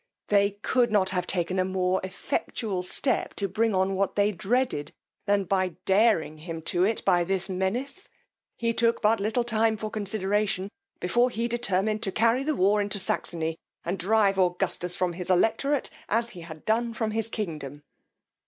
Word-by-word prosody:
They 200 0 +3
could 245 -3 +2
not 190 -3 +3
have 180 -1 -1
taken 185 0 -1
a - - +3
more 185 0 0
effectual 190 +1 -3
step 245 +8 +1
to 200 - -1
bring 215 +2 0
on 190 +1 +1
what 195 0 0
they 205 0 +3
dreaded, 215 - -1 0.3
than 200 0 +3
by 185 -2 0
daring 190 -6 +3
him 165 0 -7
to 175 +2 +1
it 220 +3 0
by 175 -1 +4
this 190 +2 -1
menace. 235 - -3 0.5
He 230 0 0
took 230 0 +1
but 220 +1 +4
little 215 +4 0
time 225 -1 +1
for 215 0 -5
consideration, 205 -1 -1 0.3
before 240 +8 +2
he 235 0 -2
determined 215 -3 0
to 195 - -1
carry 230 +5 +2
the 305 +1 0
war 205 +1 +3
into 205 0 -2
Saxony, 165 -4 -1 0.3
and 175 +2 -2
drive 200 +1 +3
Augustus 180 -1 0
from 180 -1 0
his 180 +1 -4
electorate, 240 +9 +2 0.2
as 230 +1 +1
he 180 -7 -11
had 160 -2 -10
done 230 +1 0
from 220 -1 -1
his 225 0 -1
kingdom. 150 - -5
200 Hz, 170 wpm, -27 LUFS, 185-225 Hz, 0.5 s, by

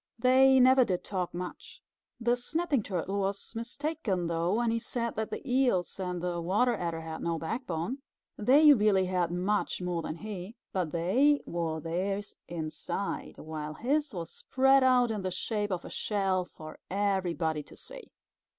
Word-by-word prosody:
They 260 +2 +6
never 260 +1 +7
did 185 -6 -1
talk 185 -3 -2
much. 180 +1 -7 0.4
The 240 +1 +2
Snapping 295 +2 0
Turtle 195 0 -2
was 195 +2 -2
mistaken 235 - -2
though, 170 +3 0
when 235 0 +1
he 230 - 0
said 235 0 -3
that 220 0 -3
the - - -6
Eels 245 -9 +1
and 180 -2 -3
the 175 -1 -1
Water 210 +8 +2
Adder 170 -4 -3
had 160 0 -6
no 170 -1 -1
backbone. 180 - -3 0.4
They 290 +7 +7
really 205 -5 +3
had 180 -2 0
much 190 +4 0
more 180 -2 -2
than 155 - -4
he, 205 +2 -7 0.2
but 180 -5 -1
they 250 - +3
wore 165 -2 -2
theirs 195 +5 -2
inside, 165 +4 -4
while 155 -1 -6
his 290 - 0
was 170 -5 -6
spread 270 +1 +3
out 250 -2 +4
in 215 -2 -2
the 185 - -2
shape 205 +3 -2
of 180 -3 -3
a - - -7
shell 195 -3 0
for 155 -2 -11
everybody 180 -5 0
to - - -14
see. - - -10
195 Hz, 165 wpm, -30 LUFS, 175-245 Hz, 0.4 s, never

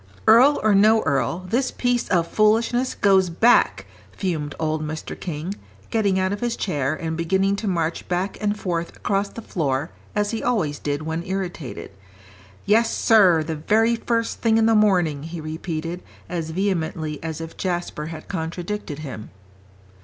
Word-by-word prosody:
"Earl 250 +7 +6
or 215 -1 +4
no 215 +3 +5
earl, 160 +5 0
this 250 +6 +1
piece 245 -1 0
of 175 -3 +2
foolishness 230 +4 +2
goes 190 -2 +4
back," 225 +8 +3 0.3
fumed 155 -6 -3
old 155 -1 -1
Mr. 155 +1 -5
King, 170 +2 -4 0.4
getting 205 -4 +2
out 190 +1 +1
of 205 - -4
his 240 -1 -1
chair, 145 -6 -1
and 160 -2 -4
beginning 190 +4 +1
to 215 - -4
march 170 -3 -1
back 180 +2 -1
and 210 0 0
forth 170 -2 -3
across 200 0 -1
the 230 - -9
floor 145 -4 -2 0.2
as 205 0 +1
he 225 - -3
always 180 -13 0
did 145 +1 -2
when 160 +1 -3
irritated. 175 - -5 0.7
"Yes, 225 +2 +3
sir, 185 -8 +5
the 160 +1 -3
very 225 +9 +2
first 230 0 -2
thing 225 -1 +3
in 225 - +4
the 225 - +4
morning," 180 -9 +3
he 165 +2 -6
repeated, 160 +2 -4 0.3
as 165 -3 -4
vehemently 160 -4 -2
as 160 -1 -5
if 165 0 -7
Jasper 175 -4 -3
had 160 -1 -8
contradicted 170 -1 -4
him. 115 -6 -7
180 Hz, 160 wpm, -23 LUFS, 160-210 Hz, 0.7 s, Earl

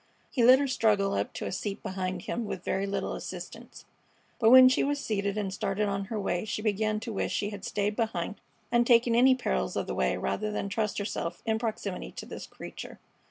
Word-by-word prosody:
He 245 - +1
let 255 +2 +9
her 280 +1 0
struggle 215 -6 +2
up 100 - -1
to - - -5
a - - -3
seat 195 +1 -4
behind 185 -1 -3
himself 230 -2 -3
with 185 -3 -5
very 195 +1 0
little 200 - -2
assistance, - - -8 0.5
but 225 - +5
when 255 +1 +10
she 255 - +3
was 290 +1 0
seated 200 -5 -2
and 195 -2 -2
started 205 0 -1
on 195 0 -2
her 215 +2 -4
way 175 -3 -1
she 215 0 -4
began 215 0 0
to 230 - -5
wish - - -1
she 205 0 -1
had 200 -2 -8
stayed 205 0 -1
behind 215 -4 -2 0.3
and 240 0 +3
taken 235 -1 +5
any 255 +3 +6
perils 65 - -1
of - - -1
the - - -4
way 65 -1 +1
rather 215 +1 -2
than 200 -1 -3
trust 210 0 -1
herself 185 -4 -3
in 220 -1 +1
proximity 215 -5 -4
to - - -7
this - - -8
creature. - - -9
210 Hz, 215 wpm, -29 LUFS, 195-230 Hz, 0.5 s, when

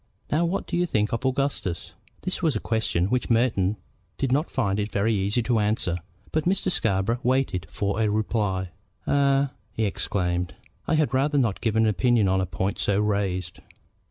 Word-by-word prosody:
Now 160 +3 +3
what 185 +4 -1
do 175 - -3
you 175 +1 +2
think 105 -8 0
of 130 +3 0
Augustus?" 130 -10 -2 0.3
This 185 +1 -2
was 160 -5 +2
a - - 0
question 110 -6 0
which 125 -1 0
Merton 110 -4 +2 0.4
did 135 -2 -1
not 145 +5 +1
find 105 -6 0
it 105 +1 -2
very 105 +3 +1
easy 100 +4 +1
to 120 -1 +2
answer. 105 -4 0 0.3
But 155 -1 0
Mr. 185 +1 +1
Scarborough 110 - +1
waited 125 -8 0
for 100 +2 -1
a 110 - +2
reply. 105 -3 0 0.4
"Eh?" 140 -1 +3 0.3
he 110 - 0
exclaimed. 90 -3 -1 0.3
"I 160 - +2
had 150 -5 +1
rather 145 +3 +2
not 115 -8 +1
give 110 -2 0
an 110 0 +4
opinion 110 0 +3
on 95 0 +2
a 95 - -1
point 95 +3 -2
so 100 0 +2
raised." 100 -4 -1
110 Hz, 185 wpm, -25 LUFS, 100-135 Hz, 0.4 s, an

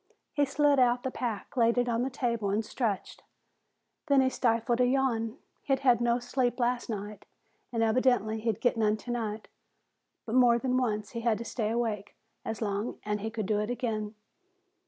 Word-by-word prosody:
He 290 - +2
slid 285 0 +3
out 245 -1 +4
of 245 - -24
the 260 - -2
pack, 230 -6 -4
laid 235 -1 +3
it 245 0 +2
on 235 -1 0
the 260 - 0
table 235 -5 -1
and 215 +3 0
stretched. 215 -5 -3 0.9
Then 280 -2 +5
he 260 0 +2
stifled 235 0 +1
a 250 - +4
yawn. 245 -3 0 0.2
He'd 270 -1 0
had 245 -3 +4
no 240 0 +3
sleep 245 0 -1
last 245 0 0
night 210 -1 -6 0.4
and 230 -2 +1
evidently 225 -1 +2
he'd 220 -2 -2
get 245 -1 +2
none 215 -1 +2
tonight, 225 -2 -4 0.8
but 225 - -5
more 245 -2 +5
than 255 +1 -1
once 215 -5 -1
he'd 235 - -4
had 230 -2 +2
to 235 - -6
stay 220 -2 -2
awake 220 -3 -2 0.3
as 225 +1 -3
long, 205 +2 -2
and 210 -1 -1
he 220 - -2
could 220 -2 -4
do 210 +1 +1
it 210 +1 -2
again. 220 -3 -3
235 Hz, 190 wpm, -29 LUFS, 215-250 Hz, 0.9 s, Then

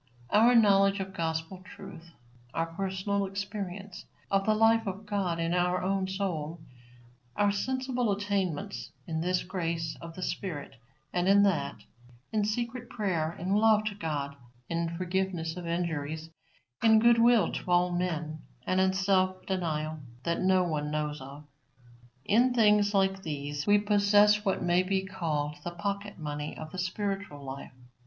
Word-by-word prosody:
Our 230 +4 +6
knowledge 200 -3 +5
of 190 0 -5
gospel 165 +2 -3
truth; 180 -3 -11 0.5
our 165 - +1
personal 190 +3 -2
experience 195 -1 -6 0.3
of 195 +1 +2
the 215 - +4
life 225 0 +4
of 195 +2 -5
God 195 -5 -1
in 165 +1 0
our 180 0 +1
own 190 0 0
soul; 175 -5 -3 0.8
our 205 0 +3
sensible 255 +1 -1
attainments 190 - -2
in 160 -1 -2
this 180 +1 0
grace 165 -3 -3
of 165 -1 -9
the 185 - -5
Spirit 165 -8 -4 0.4
and 180 0 +1
in 200 +1 +6
that; 195 -5 0 0.5
in 215 -2 +1
secret 235 +3 -3
prayer, 170 -7 -1
in 185 +3 -1
love 215 0 +5
to 215 -1 -2
God, 150 -7 -3 0.3
in 170 0 -2
forgiveness 180 -2 -1
of 180 -2 -6
injuries, 160 -2 -3 0.5
in 220 -1 +6
goodwill 235 0 +5
to - - -5
all 180 0 +3
men, 165 -3 -2 0.2
and 185 0 +2
in 190 0 +3
self 185 -1 +1
denial 155 -4 -2 0.2
that 170 0 -1
no 185 0 +4
one 150 -4 -2
knows 150 -1 -2
of, 140 +3 -10 0.8
in 245 +4 +3
things 210 -2 +4
like 195 0 +2
these 145 -2 -4
we 205 0 +6
possess 205 0 +4
what 195 -3 0
may 175 +1 +3
be 190 +1 -1
called 150 -6 -2
the - - -3
pocket 200 +4 -4
money 150 -2 -5
of 155 0 -8
the 185 - -6
spiritual 195 -4 -3
life. 135 -1 -7
185 Hz, 150 wpm, -29 LUFS, 165-205 Hz, 0.8 s, Our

